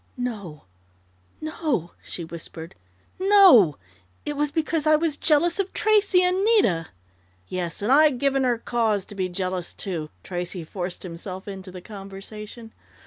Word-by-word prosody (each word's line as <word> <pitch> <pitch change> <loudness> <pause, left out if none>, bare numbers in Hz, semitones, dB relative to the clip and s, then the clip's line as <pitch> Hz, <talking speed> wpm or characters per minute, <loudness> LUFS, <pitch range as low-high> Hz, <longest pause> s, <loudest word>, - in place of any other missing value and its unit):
"No 205 - -5 0.8
no," 310 - -2
she 170 - -6
whispered. 165 0 -9 0.5
"No! 370 - +7 0.5
It 295 - -3
was 295 +1 0
because 315 0 0
I 310 - +6
was 310 -1 0
jealous 335 +5 +2
of 390 -1 -1
Tracey 415 -4 +4
and 365 +2 +2
Nita 295 - +3 0.3
" - - -37 0.3
"Yes, 180 0 -3
and 220 - +1
I'd 295 -1 +5
given 275 +1 +1
her 245 -2 +2
cause 225 -4 0
to - - -12
be 190 -2 -2
jealous, 185 -1 -3
too!" 165 -6 -4
Tracey 175 -1 -4
forced 180 +2 -6
himself 185 +2 -7
into 190 -1 -7
the 180 0 -9
conversation. 210 +3 -9
215 Hz, 145 wpm, -24 LUFS, -, 0.8 s, No